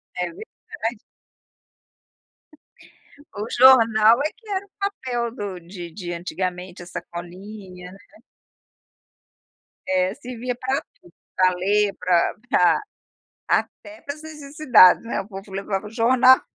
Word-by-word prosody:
É 180 - -1
verdade. 360 - -7 2.4
O 210 +1 -4
jornal 230 -3 +6
é 305 - -1
que 445 - -23
era 395 0 -2
o - - -29
papel 250 - -3
do 200 -6 -5
de 175 0 -9
de 175 -1 -6
antigamente, 180 +1 -5
a - - -12
sacolinha, 180 +2 -9
né. 195 - -14 1.9
É, 185 0 +1
servia 250 -2 -5
pra 260 +3 -1 0.2
tudo: 175 - -20 0.2
pra 185 0 +4
ler, 200 +3 +1
pra 175 -2 +2 0.2
pra 180 - +4 0.7
até 315 +1 -2
para 285 +1 -6
as 310 - -15
necessidades, 285 - +4
né, 230 - -2
o 195 - -13
povo 195 -1 -10
levava 195 +1 -3
o - - -9
jornal. 255 +3 +5
210 Hz, 125 wpm, -23 LUFS, 185-260 Hz, 2.4 s, jornal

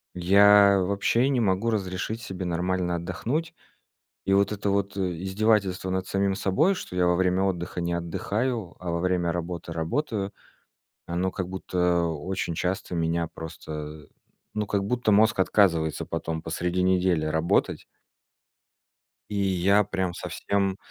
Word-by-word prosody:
Я 100 +2 +6
вообще 100 +7 +1
не 130 -3 +1
могу 100 +1 +1
разрешить 105 +2 -2
себе 95 -4 -5
нормально 90 0 -1
отдохнуть. 140 - -3 0.7
И 95 - +2
вот 100 +1 +3
это 100 -1 -1
вот, 100 0 -1
э, - - -2 0.2
издевательство 95 -1 +1
над 95 0 -1
самим 100 0 0
собой, 150 - +2
что 90 - -7
я 90 -1 +3
во 90 - +3
время 90 +1 +2
отдыха 90 -2 -2
не 85 0 -1
отдыхаю, 100 +5 -2
а, 90 -1 -4
во 85 - -1
время 90 -1 +1
работы 85 -1 -5
работаю, 100 - -2 0.7
оно 90 +2 -1
как 95 -3 -4
будто 90 -2 0
очень 85 +3 -3
часто 90 +1 -2
меня 85 0 0
просто, 80 -1 -8
э, 75 0 -7 0.5
ну, 105 -1 -1
как 100 -1 0
будто 120 0 +1
мозг 110 0 +4
отказывается 85 -5 +2
потом 80 -1 -4
посреди 85 +2 -1
недели 90 -3 +2
работать. 80 +2 0 1.4
И 105 - -4
я 100 +1 +3
прям 95 -3 -2
совсем 100 +1 -2
95 Hz, 145 wpm, -26 LUFS, 85-100 Hz, 1.4 s, Я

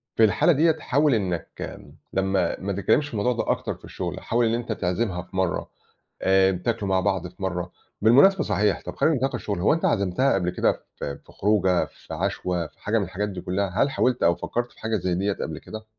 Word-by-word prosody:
في 115 - +4
الحالة 110 +10 +4
دِيَّة 160 +2 +4
تحاول 150 -2 +1
إنّك 90 -5 -4 0.3
لمّا 95 -2 0
ما 100 +1 -3
تتكلمش 100 +9 +2
في 145 - -12
الموضوع 110 +3 +1
ده 120 - 0
أكتر - - -2
في - - -15
الشغل - - -5
حاول 120 +1 +1
إن 115 - +1
أنت 120 -1 -4
تعزِمها 90 -1 -1
في 90 - -14
مرّة 95 -3 0 0.5
آآ 95 0 +4
بتاكلوا 100 +3 -2
مع 95 -1 +3
بعض 95 -1 0
في 90 +2 -17
مرّة. 90 -1 -2 0.3
بالمناسبة 145 - +6
صحيح 105 -1 +1
طَب - - -6
خلّينا 160 - +3
في 130 - +1
نِطاق 135 - -2
الشغل 100 -3 -3
هو 90 - +4
أنت 165 - -1
عزمتها 100 +6 +2
قبل 90 -2 +1
كده - - +2 0.2
ف - - -9
في 70 -1 -6
خروجة، 95 -3 +2
في - - -12
عَشوة، 90 -1 -2
في - - -29
حاجة 110 +2 +1
من - - 0
الحاجات 100 +3 -3
دي 95 -2 -6
كلّها؟ 95 +2 -1
هل 140 - 0
حاولت 125 -2 +1
أو 85 0 +4
فكَّرت 120 +6 -3
في - - -21
حاجة 110 0 0
زي 90 -1 -1
دِيَّة 100 +3 0
قَبل 80 -4 -5
كده؟ 110 +4 -9
100 Hz, 220 wpm, -25 LUFS, 90-120 Hz, 0.5 s, بالمناسبة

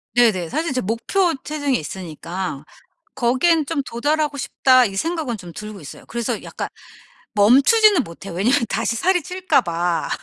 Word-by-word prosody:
네네. 215 -9 +3
사실 320 - -2
제 255 - 0
목표 325 - 0
체중이 290 -4 -1
있으니까 170 -1 -6 0.5
'거기에는 280 +6 +2
좀 285 -1 -2
도달하고 290 +4 -1
싶다.' 255 -2 +3
이 195 -3 -4
생각은 310 - -2
좀 175 -3 -10
들고 210 0 -8
있어요. 140 - -11
그래서 235 -1 -3
약간 - - -5 0.7
멈추지는 280 - +5
못 170 +3 -12
해요. 185 - -6
왜냐면 235 +8 +2
다시 230 - -1
살이 360 +7 +2
찔까 365 +4 +1
봐. 170 0 -1
245 Hz, 335 characters per minute, -21 LUFS, 195-310 Hz, 0.7 s, 멈추지는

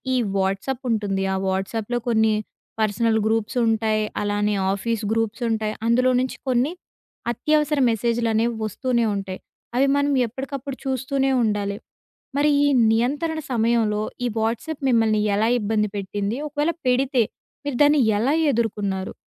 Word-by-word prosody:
ఈ - - +3 0.2
వాట్సాప్ 195 +8 -1
ఉంటుంది. 200 -3 0
ఆ - - 0
వాట్సాప్‌లో 205 +5 -2
కొన్ని 220 -1 +3 0.5
పర్సనల్ 220 +1 +2
గ్రూప్స్ 225 +1 0
ఉంటాయి. 220 -1 +1 0.2
అలానే 205 0 0 0.2
ఆఫీస్ 225 +2 -2
గ్రూప్స్ 225 +1 -1
ఉంటాయి. 215 -1 -1
అందులో 255 +2 +3
నుంచి 260 - -3
కొన్ని 255 +4 +2 0.6
అత్యవసర 300 +4 +1
మెసేజులనేవి 230 0 0
వస్తూనే 235 +2 0
ఉంటాయి. 195 -1 -5 0.4
అవి 270 - +4
మనం 285 0 +1
ఎప్పటికప్పుడు 270 +3 -6
చూస్తూనే 270 +1 0
ఉండాలి. 205 -2 -1 0.6
మరి 295 +1 +3
ఈ - - +4 0.2
నియంత్రణ 285 +8 0
సమయంలో, 225 -2 +1 0.2
ఈ - - +2
వాట్సాప్ 235 +8 -2
మిమ్మల్ని 225 -3 +3 0.2
ఎలా 220 +2 +2
ఇబ్బంది 210 0 0
పెట్టింది? 200 +3 -3
ఒకవేళ, 295 +2 0 0.2
పెడితే 255 0 +2 0.4
మీరు 285 -3 -2
దాన్ని 290 0 +5 0.2
ఎలా 255 +6 +2 0.2
ఎదుర్కున్నారు? 200 -5 -2
225 Hz, 130 wpm, -23 LUFS, 210-260 Hz, 0.6 s, దాన్ని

